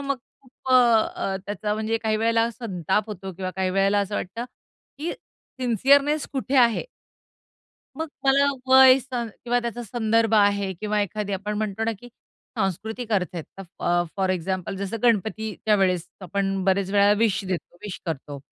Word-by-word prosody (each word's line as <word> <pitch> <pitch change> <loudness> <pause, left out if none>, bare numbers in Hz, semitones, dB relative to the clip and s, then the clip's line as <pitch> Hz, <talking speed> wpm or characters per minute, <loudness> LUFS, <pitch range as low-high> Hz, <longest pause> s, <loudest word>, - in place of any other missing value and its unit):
मग 275 -1 -1 0.3
खूप 260 0 -14
अ, 230 -5 +3
त्याचा 210 0 -2
म्हणजे 220 +1 -1
काही 220 -1 0
वेळेला 230 +1 +2
संताप 200 -3 -2
होतो 195 -2 -6
किंवा 185 +1 -4
काही 190 -1 0
वेळेला 195 +2 +2
असं 200 +1 -3
वाटतं, 230 +6 -4 0.5
की 330 +3 -3 0.5
सिन्सियरनेस 275 +5 +3
कुठे 270 0 -1
आहे? 235 -3 +4 1.1
मग 320 0 -3 0.2
मला 275 +1 +4 0.2
वय 260 0 +8
स 255 - -15
किंवा 240 0 -2
त्याचा 235 0 -4
संदर्भ 225 0 +1
आहे 200 -2 +3
किंवा 210 0 0
एखादी 205 0 -3
आपण 205 +2 -3
म्हणतो 215 0 -2
ना, 230 - 0
की 235 +4 -12
सांस्कृतिक 220 0 -5
अर्थ 185 -3 +1
आहेत 165 - -5
ते 195 - -5 0.2
अ, 175 0 +3
फॉर 190 -1 0
एक्झाम्पल, 185 +1 -2
जसं 200 +3 -3
गणपतीच्या 220 -1 +1
वेळेस 180 -3 +1
आपण 195 +1 -2
बऱ्याच 195 0 +1
वेळेला 205 0 +5
विश 210 -4 +1
देतो, 185 -2 -5
विश 205 -3 -6
करतो 145 -2 -5
210 Hz, 160 wpm, -24 LUFS, 195-235 Hz, 1.1 s, वय